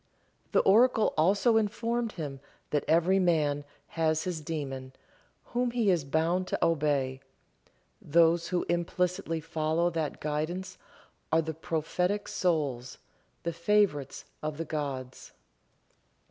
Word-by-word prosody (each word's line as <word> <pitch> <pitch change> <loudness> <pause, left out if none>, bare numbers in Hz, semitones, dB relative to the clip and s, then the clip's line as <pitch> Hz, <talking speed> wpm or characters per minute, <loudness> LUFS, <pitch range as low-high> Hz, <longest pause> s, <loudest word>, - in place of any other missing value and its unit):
The - - +4
oracle 225 +2 +4
also 200 +8 +3
informed 230 +2 -1
him 145 -5 -5 0.3
that 145 -2 +1
every 170 +4 +4
man 150 -5 +2 0.3
had 160 -1 +1
his 165 0 -3
daemon, 135 -4 -5 0.5
whom 245 0 -1
he 235 -4 +2
is 170 -5 +1
bound 165 +6 +1
to - - 0
obey; 145 -5 0 0.8
those 170 +2 +3
who 180 -1 -1
implicitly 175 -1 -1
follow 160 +2 0
that 160 -3 -3
guidance 170 +5 -3 0.5
are 160 +1 +3
the 160 0 -4
prophetic 180 +6 -1
souls, 140 -8 -1 0.5
the 170 - -2
favorites 170 -6 +1 0.2
of 155 -1 -4
the 165 - -3
gods. 135 -5 -5
165 Hz, 120 wpm, -29 LUFS, 150-185 Hz, 0.8 s, The